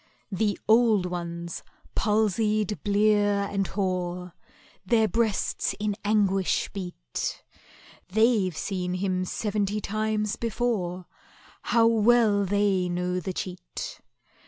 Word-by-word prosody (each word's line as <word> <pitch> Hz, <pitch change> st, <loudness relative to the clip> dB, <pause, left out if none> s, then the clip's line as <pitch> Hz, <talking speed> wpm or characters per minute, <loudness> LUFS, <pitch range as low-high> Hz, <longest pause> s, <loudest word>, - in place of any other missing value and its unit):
The 205 Hz, +2 st, 0 dB
old 220 Hz, -3 st, +4 dB
ones, 170 Hz, -1 st, -5 dB, 0.3 s
palsied, 215 Hz, 0 st, +1 dB
blear, 205 Hz, -1 st, +3 dB
and 195 Hz, -2 st, 0 dB
hoar, 180 Hz, -2 st, -2 dB, 0.5 s
Their 220 Hz, +3 st, +3 dB
breasts 220 Hz, -3 st, 0 dB
in 210 Hz, -1 st, -1 dB
anguish 200 Hz, -3 st, +1 dB
beat— 180 Hz, -, -5 dB, 0.7 s
They've 215 Hz, -4 st, +2 dB
seen 180 Hz, -2 st, -2 dB
him 185 Hz, -1 st, -1 dB
seventy 205 Hz, +1 st, -1 dB
times 215 Hz, 0 st, -1 dB
before, 205 Hz, -6 st, -2 dB, 0.6 s
How 230 Hz, -1 st, +3 dB
well 225 Hz, -2 st, +4 dB
they 195 Hz, -2 st, +1 dB
know 180 Hz, +1 st, -1 dB
the 185 Hz, +2 st, -4 dB
cheat! 180 Hz, 0 st, -6 dB
200 Hz, 100 wpm, -26 LUFS, 185-215 Hz, 0.7 s, old